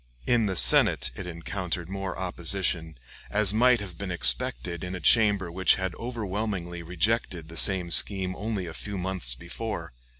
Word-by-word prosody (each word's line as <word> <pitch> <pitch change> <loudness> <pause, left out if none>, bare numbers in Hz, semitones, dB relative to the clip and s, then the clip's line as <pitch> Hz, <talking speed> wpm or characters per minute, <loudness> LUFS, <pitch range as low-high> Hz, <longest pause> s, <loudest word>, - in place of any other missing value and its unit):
In 115 -3 +1
the 95 - -3
Senate - - +4
it 90 - -8
encountered 85 0 -5
more 95 -1 -6
opposition, 85 -2 -2 0.3
as 105 -1 +2
might 120 +2 +3
have 90 -5 -10
been 100 -1 -5
expected 65 0 +3
in 90 0 -5
a - - -6
chamber 100 -1 +2
which 95 +2 +2
had 95 -1 -4
overwhelmingly 105 -6 -5
rejected 90 -1 -2
the 85 - -11
same 90 0 +3
scheme 95 0 +4
only 105 -3 -4
a 85 - -8
few 100 +3 -7
months 90 -9 +1
before. 85 - -7
95 Hz, 160 wpm, -26 LUFS, 85-100 Hz, 0.3 s, Senate